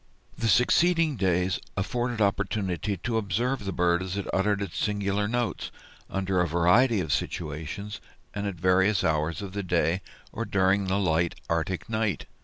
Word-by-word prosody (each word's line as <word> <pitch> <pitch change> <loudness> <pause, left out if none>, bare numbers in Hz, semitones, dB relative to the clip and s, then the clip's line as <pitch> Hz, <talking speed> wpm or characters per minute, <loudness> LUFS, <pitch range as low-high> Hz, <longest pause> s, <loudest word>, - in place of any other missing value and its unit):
The 115 - -1
succeeding 165 +6 +4
days 90 -3 +1 0.2
afforded 120 +3 -1
opportunity 100 -1 0
to 115 +6 -2
observe 110 +4 -1
the 95 - -2
bird 85 0 +2
as 95 +1 -4
it 100 - -2
uttered 100 +1 +2
its 100 -4 -4
singular 105 0 0
notes, 120 +1 -2 0.4
under 95 -1 0
a 90 - +2
variety 90 +8 +4
of 80 -3 -1
situations, 80 +7 -4 0.3
and 100 0 -3
at 100 - -3
various 95 +4 +3
hours 80 +3 0
of 95 -2 -7
the 100 - -2
day, 90 -1 +1 0.3
or 115 - -2
during 100 -2 +2
the 95 +1 +1
light 85 -3 +1 0.2
Arctic 85 +4 -1
night. 110 -3 -1
95 Hz, 160 wpm, -27 LUFS, 90-105 Hz, 0.4 s, succeeding